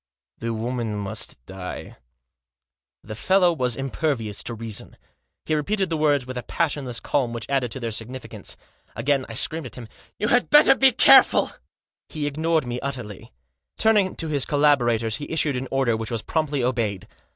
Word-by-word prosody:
" 65 +2 -70
The 115 0 -3
woman 115 -1 -3
must 100 - -4
die." 95 -1 -8 1.1
The 110 - -7
fellow 180 - +3
was 125 -6 0
impervious 135 -5 -2
to 120 - -4
reason. 110 -2 -6 0.5
He - - -1
repeated 190 +4 0
the - - +1
words 145 -4 +2
with 130 -1 -5
a - - -5
passionless 125 -1 -2
calm 125 -5 -1
which 115 -1 -5
added 135 -3 0
to 130 - -5
their 115 -2 -3
significance. 120 +4 -8 0.4
Again 140 -2 0
I 115 - -7
screamed 155 +4 -2
at - - -13
him: 120 -3 -9 0.2
" - - -30
You 210 - -1
had 245 +1 +2
better 295 -2 +7
be 270 -1 +5
careful! 265 +2 +6 0.3
" - - -70
He 155 -3 -4
ignored 155 +1 0
me 120 0 -3
utterly. 125 -8 -6 0.5
Turning 210 -4 +3
to 165 - -1
his 145 -4 +1
collaborators 120 -7 +2
he 145 - -7
issued 155 -3 0
an 130 +1 -3
order 135 -4 +1
which 110 -1 -4
was 115 -2 -3
promptly 150 -4 -1
obeyed. 110 -5 -1
130 Hz, 180 wpm, -23 LUFS, 115-155 Hz, 1.1 s, better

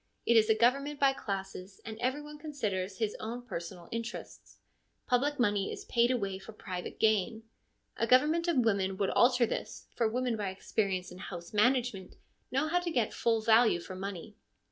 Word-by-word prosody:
It 235 - +4
is 220 0 +5
a 220 - +5
government 275 +6 +2
by 275 -1 +4
classes, 195 -5 -6
and 220 - -6
every 260 +4 0
one 300 0 -10
considers 205 -11 -3
his 220 -2 -1
own 235 +3 -5
personal 170 -6 -7
interests. 230 +1 -7 0.5
Public 280 +4 +1
money 205 -4 +1
is - - -7
paid 235 0 +3
away 200 -7 -1
for 220 - -11
private 185 -4 -6
gain. 220 +1 +2 0.5
A 230 - 0
government 305 +8 +4
of 340 -4 +2
women 195 -3 +1
would 195 -1 0
alter 250 0 +4
all 235 - +2
this, - - -5
for 230 - +2
women 245 +1 0
by 205 -2 -2
experience 190 -1 -2
in 180 - -10
house 175 -1 -8
management 235 -3 +1 0.3
know 275 +4 +1
how 355 +3 +2
to 355 -1 -3
get 240 -9 0
full 225 -1 +1
value 220 -3 +5
for 180 - -8
money. 195 +2 -6
225 Hz, 185 wpm, -31 LUFS, 195-255 Hz, 0.5 s, is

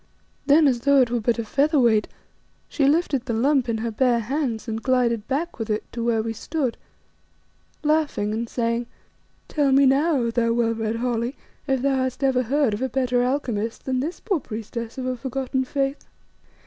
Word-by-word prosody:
Then 295 +1 +6
as 250 -3 +2
though 280 +3 +4
it 240 -2 +1
were 240 - +1
but 235 +2 +1
a 230 - -3
feather 285 +6 +2
weight, 225 -4 +3 0.6
she 280 -3 +1
lifted 285 -4 +1
the 235 -3 -2
lump 260 +1 +2
in 225 - 0
her 230 +1 -3
bare 240 +1 +2
hands 245 -2 -2
and 225 0 -3
glided 235 -4 +1
back 300 +5 -2
with 225 0 -4
it 215 0 -1
to 235 - -4
where 230 -2 +1
we 225 0 -3
stood, 270 +1 -2 1.1
laughing 300 -9 +1
and 230 +1 -3
saying 235 0 -1 0.6
"Tell 290 -3 +1
me 275 +1 +5
now, 285 +4 +3
O 235 -2 0
thou 230 0 +1
well 230 -1 +1
read 220 0 -2
Holly, 240 +2 -1 0.3
if 265 -2 0
thou 275 -1 +2
hast 260 +1 -2
ever 260 -2 +3
heard 265 -1 +1
of 205 - -4
a 260 - 0
better 250 -2 +1
alchemist 245 -4 -2
than 260 -1 0
this 315 +7 -3
poor 390 -7 -1
priestess 230 0 -6
of 260 - -4
a 255 0 -1
forgotten 260 +1 -2
faith?" 275 +1 -2
250 Hz, 195 wpm, -23 LUFS, 230-275 Hz, 1.1 s, Then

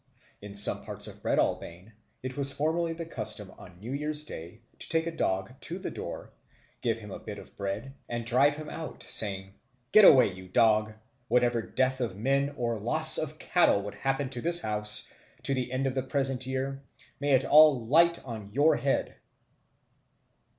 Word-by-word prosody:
In 100 0 -10
some 100 - +4
parts - - -3
of - - -6
Breadalbane 90 +6 -2 0.3
it 130 0 -6
was 140 -1 +4
formerly 160 +4 -1
the 165 0 -7
custom 105 - -5
on 90 -4 -15
New 115 +6 -8
Year's 150 +1 -4
Day 100 - -10 0.2
to - - -8
take 160 0 0
a 170 -1 -5
dog 95 -2 -2
to 175 - -5
the 190 - -6
door, - - -8 0.5
give 115 -2 -1
him 105 -3 -11
a - - -8
bit 105 -1 -9
of - - -14
bread, 100 +7 -5 0.2
and 120 -1 -4
drive 135 +5 +2
him 155 0 -9
out, 160 - -8
saying, 95 -2 +6 0.4
"Get 215 - +7
away, 130 - +6
you 95 0 -12
dog! 110 +2 +2 0.4
Whatever 120 -1 +1
death 130 +3 -1
of 110 -6 -4
men 140 +5 -1
or 115 -3 -2
loss 155 +9 +6
of 155 0 -5
cattle 155 - +1
would 105 - -7
happen 135 +1 -2
in 120 - -5
this 170 +3 +4
house 105 -2 +1 0.4
to 140 - -1
the 125 -2 -3
end 130 +1 -2
of 135 - -1
the 130 - -2
present 135 -1 -3
year, 135 +1 -4 0.4
may 145 0 0
it 130 0 +3
all 150 -6 +5
light 170 +6 +2
on 110 -5 -8
your 145 +7 +2
head!" 135 -1 -2
130 Hz, 185 wpm, -27 LUFS, 105-145 Hz, 0.5 s, Get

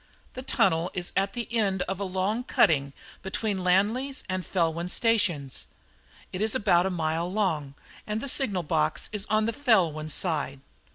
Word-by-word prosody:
The 255 - -6
tunnel 180 -9 +2
is 180 -1 -2
at 195 0 +1
the 240 -2 -3
end 195 -5 +1
of 190 0 -4
a - - -2
long 190 +5 -1
cutting 140 - +3 0.3
between 190 0 -2
Llanlys 220 +10 +1
and 185 -1 -2
Felwyn 170 0 -1
stations. 185 - +1 0.7
It 185 - -3
is 220 0 +2
about 185 -3 +3
a - - 0
mile 165 0 -1
long, 160 -9 -1 0.3
and 210 0 -1
the 280 - -4
signal 215 -10 0
box 75 - 0
is 210 0 -3
on 215 0 +2
the 230 - 0
Felwyn 180 - +2
side. 145 -5 -1
190 Hz, 165 wpm, -27 LUFS, 165-215 Hz, 0.7 s, cutting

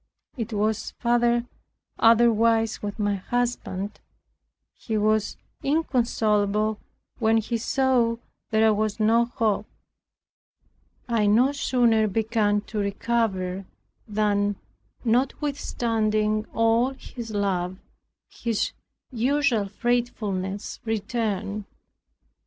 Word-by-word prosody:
It 235 -2 -4
was 215 0 -1
far 240 0 +2 0.6
otherwise 230 -1 +4
with 205 -1 -4
my 205 -2 0
husband. 210 -3 -2 0.7
He 220 -2 -3
was 215 0 +1 0.2
inconsolable 220 -7 +1 0.4
when 225 -1 +3
he 230 +2 -1
saw 250 -2 +2 0.3
there 220 0 +4
was 215 +1 -1
no 225 +2 +4
hope. 220 -3 -1 1.4
I 225 -3 +2
no 240 +7 +4
sooner 240 -6 +2
began 210 0 +1
to 215 0 -5
recover, 200 -3 -1 0.4
than 205 -1 +1 0.5
notwithstanding 225 -4 0
all 230 +4 +2
his 235 -3 -8
love, 190 -3 -1 0.5
his 230 -3 -2 0.4
usual 255 -3 +1
fretfulness 205 -4 -2
returned. 215 -2 -2
220 Hz, 85 wpm, -25 LUFS, 205-235 Hz, 1.4 s, otherwise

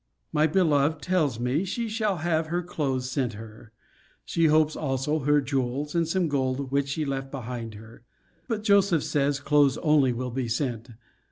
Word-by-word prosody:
My 155 0 +3
beloved 155 -3 +2
tells 155 -10 0
me, 125 +8 0
she 230 +5 -3
shall 215 -3 -1
have 160 -2 +1
her 175 +2 -2
clothes 135 -7 -2
sent 130 -5 -1
her. 110 +1 -11 0.5
She 165 -1 +2
hopes 155 0 +3
also 140 +2 -1
her 145 +1 +3
jewels, 135 +2 -2
and 170 -1 +1
some 180 +1 +1
gold, 135 -2 -1
which 140 0 0
she 150 +2 -2
left 135 -1 -3
behind 120 -4 -6
her: 110 +2 -13 0.5
but 215 -2 -2
Joseph 200 -6 +3
says, 140 -1 0
clothes 145 -2 +3
only 150 -5 +3
will 125 +1 -4
be 125 0 -2
sent. 120 -1 -2
145 Hz, 170 wpm, -26 LUFS, 130-160 Hz, 0.5 s, My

